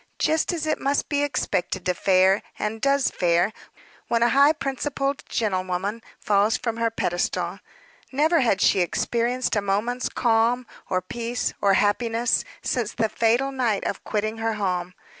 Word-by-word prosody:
Just 315 Hz, +3 st, +1 dB
as 330 Hz, -3 st, -3 dB
it 310 Hz, -, 0 dB
must 280 Hz, +1 st, 0 dB
be 285 Hz, -1 st, +1 dB
expected 200 Hz, -9 st, -1 dB
to 180 Hz, -, +2 dB
fare, 190 Hz, +2 st, +3 dB, 0.2 s
and 220 Hz, +1 st, -3 dB
does 275 Hz, 0 st, +2 dB
fare, 175 Hz, +4 st, +1 dB, 0.5 s
when 235 Hz, 0 st, +2 dB
a 240 Hz, -, +4 dB
high 280 Hz, +4 st, +6 dB
principled 275 Hz, -1 st, -2 dB
gentlewoman 190 Hz, 0 st, -1 dB, 0.2 s
falls 210 Hz, +3 st, +2 dB
from 230 Hz, -2 st, -3 dB
her 230 Hz, 0 st, +1 dB
pedestal. 175 Hz, -5 st, -2 dB, 0.5 s
Never 310 Hz, +5 st, +3 dB
had 220 Hz, -7 st, +2 dB
she -, -, +4 dB
experienced 235 Hz, +8 st, 0 dB
a 205 Hz, -, +2 dB
moment's 215 Hz, +6 st, -1 dB
calm, 235 Hz, +1 st, +1 dB, 0.2 s
or 185 Hz, -1 st, 0 dB
peace, 235 Hz, +5 st, -3 dB
or 200 Hz, -1 st, +4 dB
happiness, 230 Hz, +3 st, +1 dB, 0.2 s
since 240 Hz, -5 st, -1 dB
the 220 Hz, -1 st, 0 dB
fatal 235 Hz, +6 st, +1 dB
night 240 Hz, -6 st, 0 dB
of -, -, -3 dB
quitting 215 Hz, +1 st, -2 dB
her 225 Hz, 0 st, 0 dB
home. 180 Hz, -3 st, -2 dB
230 Hz, 155 wpm, -24 LUFS, 200-255 Hz, 0.5 s, high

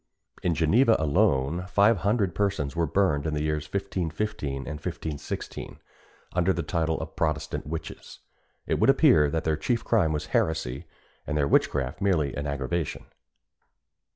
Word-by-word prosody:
In 85 Hz, -2 st, +1 dB
Geneva 110 Hz, -, +4 dB
alone 75 Hz, +2 st, +1 dB
five 100 Hz, +4 st, +4 dB
hundred 100 Hz, -1 st, +1 dB
persons 95 Hz, -8 st, -1 dB
were 85 Hz, -1 st, +1 dB
burned 80 Hz, -4 st, +1 dB
in 75 Hz, -, -1 dB
the 75 Hz, -, -1 dB
years 75 Hz, -1 st, -1 dB
1515 95 Hz, -4 st, -2 dB
and 70 Hz, -, -6 dB
1516, 75 Hz, -1 st, -5 dB, 0.6 s
under 90 Hz, +1 st, +2 dB
the 85 Hz, -2 st, -2 dB
title 80 Hz, 0 st, -1 dB
of 80 Hz, 0 st, -7 dB
Protestant 75 Hz, -3 st, -2 dB
witches. 80 Hz, +1 st, -7 dB, 0.5 s
It -, -, 0 dB
would -, -, +4 dB
appear 75 Hz, -2 st, +5 dB
that 80 Hz, +2 st, -1 dB
their 80 Hz, -1 st, 0 dB
chief 115 Hz, +8 st, -1 dB
crime 100 Hz, -9 st, +2 dB
was 75 Hz, -1 st, -2 dB
heresy, 80 Hz, -6 st, 0 dB, 0.4 s
and 75 Hz, -, -1 dB
their 70 Hz, -2 st, +2 dB
witchcraft 70 Hz, +3 st, +1 dB
merely 80 Hz, -9 st, +1 dB
an 75 Hz, 0 st, -4 dB
aggravation. 70 Hz, +3 st, -3 dB
80 Hz, 150 wpm, -26 LUFS, 75-95 Hz, 0.6 s, appear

